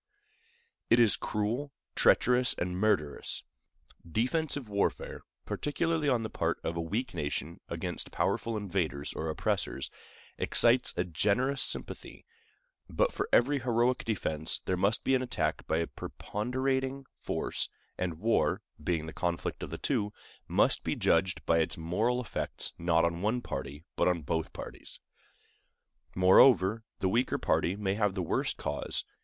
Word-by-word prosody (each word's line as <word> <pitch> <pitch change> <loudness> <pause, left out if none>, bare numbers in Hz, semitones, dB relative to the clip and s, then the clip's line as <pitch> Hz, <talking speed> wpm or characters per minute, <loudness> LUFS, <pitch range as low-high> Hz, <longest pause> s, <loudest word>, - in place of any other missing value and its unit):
It 115 - +6
is 115 -3 +5
cruel, 115 +7 -2 0.2
treacherous, 125 +1 +4
and 90 0 -2
murderous. 90 -8 0 0.6
Defensive 130 - -1
warfare, 100 -1 -1 0.2
particularly 160 0 0
on 120 -4 +2
the 110 - -3
part - - -1
of 85 - -2
a 85 - -1
weak 110 +10 -2
nation 75 +3 -3
against - - -3
powerful 115 -1 0
invaders 90 -8 -2
or 80 - -3
oppressors, 70 -3 -2 0.5
excites 120 +1 +5
a 90 - +2
generous 105 - +1
sympathy; - - -3 0.6
but - - +1
for 400 +3 -2
every 145 0 +4
heroic 120 0 +1
defense 80 -8 -1
there 95 - +1
must 100 +5 +1
be 135 - +2
an 130 - +3
attack 80 -11 -2
by 80 - +1
a 85 - +1
preponderating 130 +8 -2 0.2
force, - - -2 0.3
and 90 -3 -2
war, 110 +6 +1 0.2
being 80 -1 0
the 80 - -7
conflict 85 -1 -2
of - - -5
the - - -5
two, 105 0 0 0.4
must - - +3
be - - -1
judged 85 -1 +1
by 85 0 +4
its 80 - 0
moral 105 +10 0
effects 125 - -3
not 85 -1 +3
on 85 +1 -1
one 110 +5 +1
party, 70 - -6
but - - +2
on 90 -3 +1
both 80 +3 -2
parties. - - -8 1.2
Moreover, 95 +3 +6 0.2
the 95 - +2
weaker 120 +7 +1
party 90 +3 +1
may 100 -2 -1
have 105 -2 +1
the 95 - -1
worse 80 - 0
cause. - - -3
100 Hz, 145 wpm, -30 LUFS, 85-125 Hz, 1.2 s, It